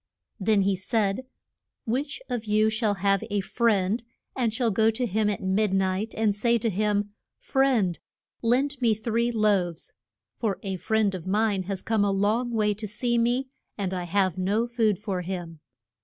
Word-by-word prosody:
] -, -, -62 dB
Then 205 Hz, 0 st, +3 dB
he 195 Hz, 0 st, +2 dB
said, 205 Hz, +4 st, 0 dB, 0.6 s
Which 275 Hz, -, -2 dB
of 240 Hz, -3 st, -3 dB
you 215 Hz, +1 st, +3 dB
shall 220 Hz, -2 st, +1 dB
have 195 Hz, +1 st, +1 dB
a 205 Hz, -1 st, 0 dB
friend 210 Hz, 0 st, +1 dB, 0.3 s
and 240 Hz, -4 st, +1 dB
shall 230 Hz, 0 st, 0 dB
go 220 Hz, +2 st, +3 dB
to 225 Hz, +3 st, -1 dB
him 215 Hz, 0 st, +1 dB
at 205 Hz, -, -3 dB
mid 195 Hz, +1 st, +1 dB
night 190 Hz, +3 st, 0 dB
and 215 Hz, -2 st, +2 dB
say 235 Hz, +3 st, +2 dB
to 225 Hz, 0 st, -1 dB
him, 205 Hz, +1 st, 0 dB, 0.2 s
Friend, 250 Hz, -10 st, +1 dB, 0.4 s
lend 260 Hz, +4 st, +1 dB
me 230 Hz, -3 st, +3 dB
three 230 Hz, +2 st, 0 dB
loaves: 200 Hz, -7 st, 0 dB, 0.4 s
for 205 Hz, -4 st, -1 dB
a 195 Hz, -2 st, -3 dB
friend 215 Hz, +1 st, +1 dB
of 185 Hz, -1 st, -6 dB
mine 205 Hz, 0 st, +1 dB
has 195 Hz, -2 st, -2 dB
come 220 Hz, -2 st, +1 dB
a 205 Hz, -, +2 dB
long 210 Hz, +5 st, +1 dB
way 215 Hz, -3 st, +1 dB
to 215 Hz, +1 st, -6 dB
see 235 Hz, +3 st, 0 dB
me, 245 Hz, +3 st, +1 dB, 0.3 s
and 190 Hz, -3 st, -2 dB
I 180 Hz, -1 st, -3 dB
have 185 Hz, 0 st, +1 dB
no 205 Hz, +5 st, +1 dB
food 230 Hz, -4 st, +1 dB
for 200 Hz, -3 st, -3 dB
him. 175 Hz, -3 st, -6 dB
210 Hz, 180 wpm, -26 LUFS, 195-230 Hz, 0.6 s, Then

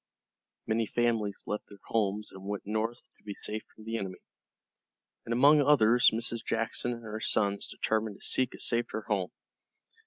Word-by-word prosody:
Many 110 Hz, 0 st, +1 dB
families 115 Hz, -4 st, +1 dB
left 105 Hz, -, -3 dB
their 100 Hz, -, -12 dB
homes 105 Hz, -1 st, 0 dB
and 95 Hz, 0 st, -11 dB
went 100 Hz, 0 st, -4 dB
north 110 Hz, +3 st, -1 dB, 0.2 s
to -, -, -29 dB
be 100 Hz, -1 st, -6 dB
safe 110 Hz, +1 st, -3 dB
from 110 Hz, -, -13 dB
the 115 Hz, +1 st, -2 dB
enemy, 95 Hz, -1 st, -5 dB, 1.1 s
and -, -, -4 dB
among 145 Hz, +5 st, +6 dB
others 125 Hz, -5 st, +6 dB
Mrs. 115 Hz, +1 st, -1 dB
Jackson 115 Hz, +2 st, -1 dB
and 115 Hz, -1 st, -9 dB
her 110 Hz, 0 st, -5 dB
sons 100 Hz, -2 st, +1 dB
determined 110 Hz, -2 st, -1 dB
to -, -, -7 dB
seek 130 Hz, -2 st, +1 dB
a -, -, -13 dB
safer 115 Hz, -2 st, -1 dB
home. 95 Hz, -4 st, 0 dB
110 Hz, 165 wpm, -30 LUFS, 105-115 Hz, 1.1 s, among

